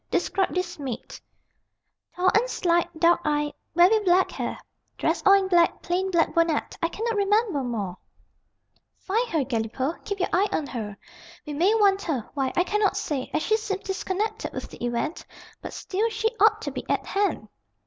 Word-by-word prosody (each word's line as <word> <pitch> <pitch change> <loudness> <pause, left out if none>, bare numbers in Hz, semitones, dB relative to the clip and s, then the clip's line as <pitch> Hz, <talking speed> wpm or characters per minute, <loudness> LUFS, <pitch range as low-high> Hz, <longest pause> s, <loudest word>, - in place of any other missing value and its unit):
Describe 370 +2 0
this 360 -3 -2
maid." 260 -4 -6 1.0
"Tall 365 +1 +3
and 475 +4 +3
slight, 345 -5 +1
dark 340 +1 +4
eyed, 295 0 0 0.2
very 365 +6 +6
black 370 0 +3
hair. - - -4 0.4
Dressed - - 0
all 390 - +9
in 395 -1 +4
black, 345 -2 +3
plain 365 +2 0
black 340 -3 +2
bonnet. 335 -2 +1
I 335 - +2
cannot 455 +4 -2
remember 405 -5 +2
more." 205 -7 -3 1.0
"Find 455 +5 -1
her, 315 -7 +1
Galipaud 250 +5 -2
keep 405 -1 -4
your 365 - 0
eye 390 +4 +3
on 305 - -1
her. 215 -7 -6 0.5
We 300 - -5
may 360 +9 +3
want 400 -2 +4
her 270 - -2
why, 270 -3 -1
I 355 - +4
cannot 405 0 +1
say, 295 -10 -3
as 310 - 0
she 435 - +2
seems 415 -3 -4
disconnected 400 +3 -3
with - - -6
the - - -10
event, 240 +7 -2 0.4
but - - -7
still 420 +5 -1
she 445 0 0
ought - - +4
to - - -3
be - - -5
at - - 0
hand." 390 - -1
360 Hz, 180 wpm, -25 LUFS, 295-405 Hz, 1.0 s, all